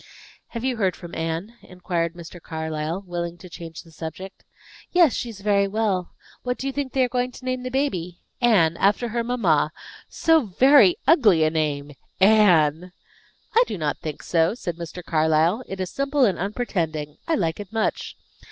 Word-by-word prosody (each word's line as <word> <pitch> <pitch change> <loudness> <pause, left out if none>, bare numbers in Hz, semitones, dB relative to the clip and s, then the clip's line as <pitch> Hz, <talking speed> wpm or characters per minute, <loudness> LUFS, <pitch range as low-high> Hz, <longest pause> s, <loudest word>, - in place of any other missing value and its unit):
"Have 230 -1 -6
you 255 -2 -1
heard 190 -4 +1
from 175 -1 -11
Anne?" 165 +7 -3
inquired 175 -2 -3
Mr. 170 0 -11
Carlyle, 160 +3 -4
willing 175 -1 -4
to 180 - -12
change 165 -2 -9
the 165 - -18
subject. 165 +4 -8 0.5
"Yes, 345 -7 +5
she 240 - -3
is 205 -3 -10
very 200 -1 +2
well. 195 -3 -1 0.3
What 250 0 -2
do - - -6
you 275 - -2
think 280 -2 -3
they 265 - +3
are - - +2
going 250 0 -1
to 255 - -12
name 255 0 -2
the 255 - -4
baby? 185 - -2 0.2
Anne; 175 -9 +4
after 210 +5 +2
her 235 +1 -1
mamma. 185 -12 +1 0.4
So 320 -7 +2
very 275 - +6
ugly 210 - +5
a 155 - +2
name! 150 -2 -2 0.3
Anne!" 180 -5 +4 0.6
"I 470 - +6
do - - -4
not 150 -3 -2
think 155 -2 -6
so," 165 +4 +1
said 175 -8 -5
Mr. 170 +1 -7
Carlyle. 160 +7 +2
"It 195 - -6
is 185 -1 -3
simple 275 -1 +1
and 195 - 0
unpretending, 165 -8 -3
I 330 - +2
like 165 -2 -1
it 205 -1 -8
much. 225 -1 -2
185 Hz, 180 wpm, -23 LUFS, 165-240 Hz, 0.6 s, very